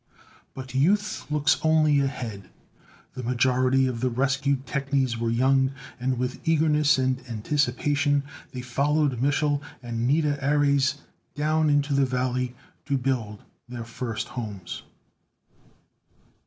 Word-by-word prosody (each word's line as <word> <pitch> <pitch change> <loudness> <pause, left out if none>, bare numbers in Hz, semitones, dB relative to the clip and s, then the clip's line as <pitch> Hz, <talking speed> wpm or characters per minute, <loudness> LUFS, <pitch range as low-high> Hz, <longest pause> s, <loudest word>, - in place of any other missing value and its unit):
But 130 -1 -8
Youth 195 +11 +1
looks 150 -1 +2
only 155 -2 +4
ahead. 120 -8 -3 0.6
The 130 - -6
majority 130 +2 +2
of 125 -3 -2
the 130 - +2
rescued 140 +2 0
technies 140 -3 0
were 115 0 0
young, 130 +3 +2 0.3
and 130 0 -1
with 125 +1 -2
eagerness 155 -2 +3
and 130 0 0
anticipation, 145 +4 +1 0.3
they 125 - -5
followed 140 +1 0
Mich'l 145 +1 +1 0.2
and 120 0 -2
Nida 145 -1 +1
Ares 140 0 +2 0.3
down 155 +1 +1
into 145 0 +2
the 140 -1 +3
valley 125 0 -1 0.3
to 140 -2 +1
build 120 -5 -2 0.3
their 120 -2 -6
first 115 -1 -4
homes. 105 -6 -6
135 Hz, 120 wpm, -25 LUFS, 125-145 Hz, 0.6 s, only